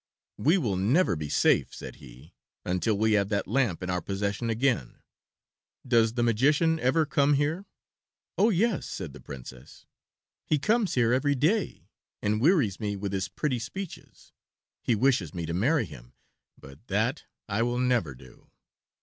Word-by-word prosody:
"We 160 Hz, +7 st, +4 dB
will 110 Hz, -, -1 dB
never 120 Hz, -, +2 dB
be 75 Hz, -2 st, -5 dB
safe," -, -, +2 dB
said -, -, -9 dB
he, -, -, -15 dB, 0.3 s
"until 90 Hz, +4 st, 0 dB
we 110 Hz, +1 st, +2 dB
have 100 Hz, -2 st, +2 dB
that 100 Hz, -1 st, 0 dB
lamp 120 Hz, -11 st, 0 dB
in 90 Hz, -, -2 dB
our 90 Hz, 0 st, -1 dB
possession 100 Hz, +5 st, -2 dB
again. 115 Hz, -, -1 dB, 0.8 s
Does 115 Hz, -2 st, +3 dB
the 120 Hz, -1 st, 0 dB
magician 145 Hz, +8 st, +2 dB
ever 145 Hz, +5 st, +2 dB
come 140 Hz, 0 st, +2 dB
here?" 155 Hz, +7 st, -1 dB, 0.7 s
"Oh, 215 Hz, -, +4 dB
yes," 215 Hz, 0 st, +1 dB
said 85 Hz, -8 st, -6 dB
the -, -, -12 dB
Princess; 65 Hz, 0 st, -11 dB, 0.6 s
"he 155 Hz, -, +2 dB
comes 215 Hz, -, +1 dB
here 120 Hz, -1 st, +3 dB
every 145 Hz, +2 st, +2 dB
day 180 Hz, -, 0 dB, 0.3 s
and 105 Hz, +1 st, 0 dB
wearies 140 Hz, -, +3 dB
me 105 Hz, -2 st, -2 dB
with 100 Hz, 0 st, -4 dB
his 95 Hz, -1 st, -1 dB
pretty 125 Hz, +6 st, -2 dB
speeches. 165 Hz, +11 st, -9 dB, 0.5 s
He 120 Hz, -, +1 dB
wishes 105 Hz, -, +1 dB
me 85 Hz, -2 st, -3 dB
to 85 Hz, -, -4 dB
marry 125 Hz, -, +2 dB
him, -, -, -13 dB, 0.4 s
but 70 Hz, -, -15 dB
that 110 Hz, +8 st, -1 dB, 0.2 s
I 105 Hz, +1 st, -1 dB
will 120 Hz, +1 st, 0 dB
never 125 Hz, -, +1 dB
do." 65 Hz, 0 st, -18 dB
115 Hz, 160 wpm, -27 LUFS, 95-145 Hz, 0.8 s, We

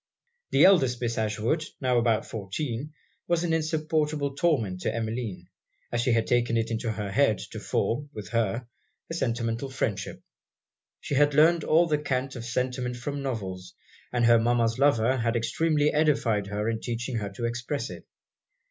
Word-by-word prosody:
The -, -, +5 dB
eldest 135 Hz, -11 st, +4 dB
Miss 120 Hz, -1 st, -1 dB
Ashwood, 110 Hz, +8 st, 0 dB, 0.2 s
now 125 Hz, -3 st, +2 dB
about 115 Hz, -2 st, +1 dB
fourteen, 115 Hz, +7 st, -4 dB, 0.4 s
was 175 Hz, 0 st, +1 dB
an 170 Hz, -2 st, 0 dB
insupportable 155 Hz, -2 st, 0 dB
torment 120 Hz, -, +1 dB
to -, -, 0 dB
Emmeline, 110 Hz, -5 st, -4 dB, 0.4 s
as 120 Hz, -, 0 dB
she 125 Hz, +1 st, +1 dB
had 115 Hz, -1 st, +2 dB
taken 120 Hz, -1 st, +2 dB
it 115 Hz, 0 st, -1 dB
into 115 Hz, 0 st, -1 dB
her 105 Hz, -2 st, -4 dB
head 115 Hz, -2 st, +3 dB
to -, -, -6 dB
form, 145 Hz, +5 st, -1 dB
with 105 Hz, -8 st, -8 dB
her, 115 Hz, +1 st, 0 dB, 0.5 s
a -, -, -2 dB
sentimental 120 Hz, -3 st, -1 dB
friendship. 110 Hz, -7 st, -3 dB, 0.8 s
She -, -, -4 dB
had 145 Hz, +1 st, +3 dB
learned 160 Hz, +2 st, +5 dB
all 165 Hz, +2 st, +4 dB
the 150 Hz, -3 st, +1 dB
cant 135 Hz, -2 st, -2 dB
of 115 Hz, -2 st, -6 dB
sentiment 125 Hz, 0 st, -2 dB
from 140 Hz, +4 st, -4 dB
novels; 95 Hz, -8 st, -5 dB, 0.4 s
and 120 Hz, -1 st, +2 dB
her 115 Hz, 0 st, +6 dB
mama's 115 Hz, 0 st, +1 dB
lovers 130 Hz, -2 st, +3 dB
had 115 Hz, 0 st, 0 dB
extremely 150 Hz, +5 st, +1 dB
edified 135 Hz, -9 st, +2 dB
her 105 Hz, +1 st, -2 dB
in 115 Hz, -1 st, -1 dB
teaching 120 Hz, +1 st, -3 dB
her 105 Hz, -2 st, -3 dB
to 115 Hz, +4 st, -4 dB
express 120 Hz, 0 st, -3 dB
it. 85 Hz, -, -10 dB
120 Hz, 165 wpm, -27 LUFS, 115-145 Hz, 0.8 s, her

